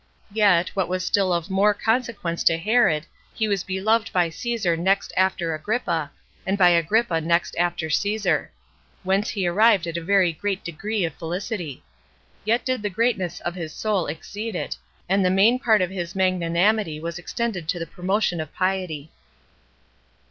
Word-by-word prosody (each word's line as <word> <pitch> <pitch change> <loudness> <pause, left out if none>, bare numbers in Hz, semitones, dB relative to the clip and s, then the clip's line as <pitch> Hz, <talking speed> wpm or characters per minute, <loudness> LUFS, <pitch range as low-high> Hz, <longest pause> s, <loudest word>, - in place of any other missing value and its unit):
Yet, 200 -5 +4
what 190 -3 -1
was 185 +1 -2
still 195 -1 +2
of 170 +2 -1
more 205 +2 +3
consequence 220 -7 -1
to 165 - +5
Herod, 170 -5 +2 0.3
he 220 - 0
was 200 -3 0
beloved 215 +4 0
by 175 -2 +2
Caesar 225 -4 -1
next 190 +4 0
after 185 -3 +1
Agrippa, 165 -3 -2 0.3
and 195 +1 -1
by 180 -2 +6
Agrippa 170 +1 +2
next 170 +2 +1
after 175 -2 0
Caesar; 200 -4 0 0.5
whence 195 +3 +1
he 195 -4 -2
arrived 200 +1 +4
at 170 0 -4
a - - -3
very 185 -1 +3
great 195 +3 -3
degree 195 +4 -2
of 165 - -4
felicity. 175 - -5 0.6
Yet 230 +3 +1
did 255 -3 -1
the 205 - -1
greatness 190 -4 -1
of 175 - -3
his 165 -4 -6
soul 205 -5 -1
exceed 205 +8 -5
it, - - -3 0.3
and 195 +1 +2
the 180 - +3
main 205 +7 +4
part 220 -7 +3
of 180 - -3
his 175 -2 -5
magnanimity 185 -1 +1
was 170 +2 -5
extended 190 -3 -3
to 175 - 0
the 165 - -4
promotion 180 +1 -1
of 155 - -7
piety. 185 -5 -2
185 Hz, 165 wpm, -23 LUFS, 170-210 Hz, 0.6 s, by